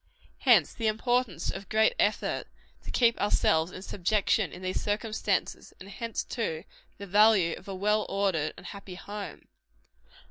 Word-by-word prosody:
Hence - - +4
the 225 - -2
importance 225 -5 0
of 195 -1 -8
great 220 - +3
effort - - 0 0.4
to - - -10
keep 235 -2 +2
ourselves 165 -4 +2
in 185 - -9
subjection 200 0 +1
in 180 - -10
these 185 0 -2
circumstances; 210 -1 -2
and 195 - -11
hence, 230 +3 -4
too, 165 -10 -3 0.3
the 200 - -7
value 200 -3 +5
of 185 - -14
a 195 - -5
well 210 +2 +1
ordered 190 -6 0
and - - -12
happy 200 -2 -8
home. 205 +2 -8
200 Hz, 150 wpm, -28 LUFS, 185-220 Hz, 0.4 s, value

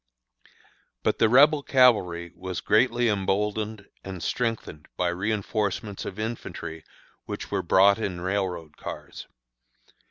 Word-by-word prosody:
But - - +1
the 115 - +4
Rebel 145 +5 +6
cavalry 100 -12 +3
was 95 -1 -5
greatly 120 +2 +3
emboldened 105 +1 -1 0.2
and 95 -3 -7
strengthened 115 -11 -3
by 90 -1 +1
reënforcements 105 +1 -2
of 95 - -7
infantry 90 -7 -5 0.4
which - - -6
were - - 0
brought 100 +2 +5
in 95 -5 -3
railroad 90 -4 -3
cars. - - -8
100 Hz, 115 wpm, -26 LUFS, 90-110 Hz, 0.4 s, Rebel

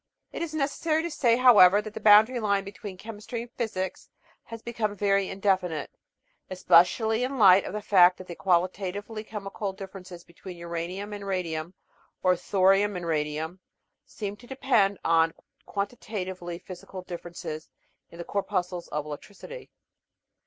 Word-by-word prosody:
It - - -5
is 320 -2 -4
necessary 310 +2 0
to 340 - -3
say, 240 -5 +3
however, 205 -6 +7
that 210 0 -6
the - - -6
boundary 220 +4 +6
line 200 -3 +1
between 195 -1 -9
Chemistry 225 +3 -7
and 240 - -14
Physics 190 -6 -4 0.4
has 230 0 -9
become 220 -3 -2
very 200 -1 +1
indefinite, 190 -5 -1 0.6
especially 220 +6 +3
in 265 +2 -2
light 195 -3 +7
of - - -6
the 210 0 -4
fact 180 -3 +6
that 185 - -10
the 175 - -7
qualitatively 190 +4 -1
chemical 200 -2 -5
dif 190 0 -9
ferences 180 -2 -11
between 175 +1 -11
Uranium 170 +4 -5
and 200 -1 -7
Radium 175 -2 -3 0.5
or 185 -1 +4
Thorium 195 +3 +2
and 175 -1 -5
Radium 155 +2 -2 0.4
seem 205 -2 -6
to 240 - -16
depend 240 -7 +2
on 165 0 +3 0.3
quantitatively 190 -4 -4
physical 185 +1 -10
differences 170 -3 -7 0.4
in 170 - -14
the 170 - -5
cor 200 +3 -1
puscles 180 -3 -3
of 150 0 -3
electricity. 205 - -9
195 Hz, 150 wpm, -27 LUFS, 180-215 Hz, 0.6 s, however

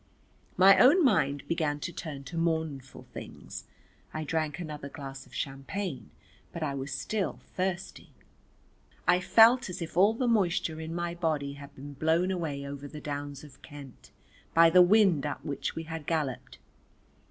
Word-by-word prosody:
My 195 +1 +7
own 295 - +6
mind 145 - +2
began 155 -3 -1
to 170 - -4
turn 145 -5 -6
to 135 - -9
mournful 160 -5 -2
things. - - -9 0.5
I 155 - -2
drank 155 -1 -1
another 150 -4 -6
glass 135 -2 -9
of - - -15
champagne, 135 - -4 0.4
but 170 - -5
I 145 -2 -1
was 135 0 -5
still 190 +9 -2 0.2
thirsty. 185 0 -3 1.0
I 180 0 +5
felt 225 +5 +5
as 180 - -6
if 165 -2 -6
all 200 +5 +5
the 250 +1 0
moisture 175 -7 +1
in 160 +1 -5
my 175 0 -2
body 155 -5 -1
had 140 0 -12
been 145 +2 -9
blown 160 +6 +1
away 155 -6 -3
over 140 0 -7
the 150 +1 -9
downs 145 -1 -5
of 150 -2 -15
Kent 145 -4 -12 0.5
by 165 0 +7
the 180 +1 +8
wind 185 -5 +5
up 145 - -6
which 145 -2 -3
we 160 - -4
had 160 -2 -7
galloped. 150 -6 -2
160 Hz, 165 wpm, -29 LUFS, 140-180 Hz, 1.0 s, the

